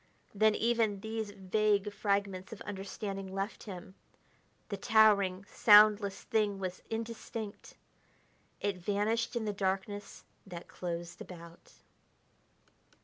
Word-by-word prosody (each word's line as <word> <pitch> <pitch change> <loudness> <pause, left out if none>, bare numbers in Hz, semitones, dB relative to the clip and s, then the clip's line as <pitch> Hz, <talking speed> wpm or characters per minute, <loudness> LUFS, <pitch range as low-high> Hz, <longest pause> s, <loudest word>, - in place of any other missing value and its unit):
Then 215 +1 +4
even 225 -3 +1
these 220 0 -3
vague 205 +1 +1
fragments 200 -2 -1
of 220 - -8
understanding 195 -1 -5
left 195 +2 -3
him. 185 -2 -8 0.8
The 200 - -3
towering, 200 -3 +4
soundless 210 -2 +6
thing 210 -4 +1
was 185 -1 -5
indistinct... 225 -1 -6 0.9
it 200 -2 -1
vanished 210 +6 0
in 230 -2 -1
the 210 - -1
darkness 195 +1 -3 0.2
that 175 -2 -8
closed 170 -1 -6
about.... 170 -1 -12
205 Hz, 105 wpm, -32 LUFS, 190-215 Hz, 0.9 s, soundless